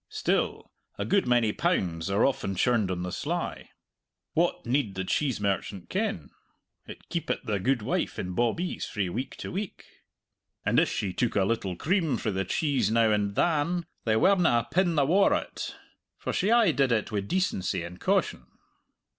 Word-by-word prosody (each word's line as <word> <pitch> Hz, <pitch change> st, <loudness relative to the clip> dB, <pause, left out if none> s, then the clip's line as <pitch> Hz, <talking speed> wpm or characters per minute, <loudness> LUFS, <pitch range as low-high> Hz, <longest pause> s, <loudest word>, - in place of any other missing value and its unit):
Still, -, -, -1 dB, 0.3 s
a -, -, -2 dB
good 200 Hz, -8 st, +2 dB
many 120 Hz, -3 st, +3 dB
pounds 85 Hz, -1 st, 0 dB
are 100 Hz, +2 st, +3 dB
often 100 Hz, -8 st, -1 dB
churned 110 Hz, 0 st, +2 dB
on 90 Hz, -1 st, -2 dB
the 90 Hz, -, -4 dB
sly. -, -, -3 dB, 0.6 s
What 170 Hz, +2 st, +1 dB
need 120 Hz, -5 st, 0 dB
the 95 Hz, -, -2 dB
cheese 130 Hz, +5 st, 0 dB
merchant 100 Hz, -1 st, -2 dB
ken? -, -, -2 dB, 0.6 s
it -, -, -11 dB
keepit 170 Hz, -, -2 dB
the 105 Hz, -4 st, -1 dB
gudewife 120 Hz, +1 st, 0 dB
in 90 Hz, 0 st, -4 dB
bawbees 120 Hz, -, -1 dB
frae 100 Hz, -4 st, -2 dB
week 125 Hz, +9 st, -4 dB
to -, -, -7 dB
week; 195 Hz, +1 st, -5 dB, 0.8 s
and -, -, +4 dB
if -, -, +3 dB
she 95 Hz, -3 st, -2 dB
took 120 Hz, -, 0 dB
a 100 Hz, -, +3 dB
little 100 Hz, -4 st, -1 dB
cream 160 Hz, -, +1 dB
frae 110 Hz, -, -2 dB
the 95 Hz, 0 st, -1 dB
cheese 135 Hz, -, +1 dB
now 115 Hz, 0 st, +3 dB
and 100 Hz, -1 st, 0 dB
than 170 Hz, +3 st, +1 dB, 0.2 s
they 110 Hz, -1 st, +2 dB
werena 165 Hz, -, +4 dB
a -, -, -12 dB
pin 175 Hz, -2 st, +2 dB
the 145 Hz, -2 st, +3 dB
waur 190 Hz, +7 st, +4 dB
o't, -, -, -4 dB, 0.4 s
for -, -, -4 dB
she 195 Hz, -, +1 dB
aye 230 Hz, -5 st, +5 dB
did 135 Hz, -3 st, +2 dB
it 115 Hz, -1 st, 0 dB
wi' 105 Hz, -, 0 dB
decency 100 Hz, -, -1 dB
and 90 Hz, +1 st, -8 dB
caution! -, -, 0 dB
115 Hz, 175 wpm, -28 LUFS, 100-160 Hz, 0.8 s, aye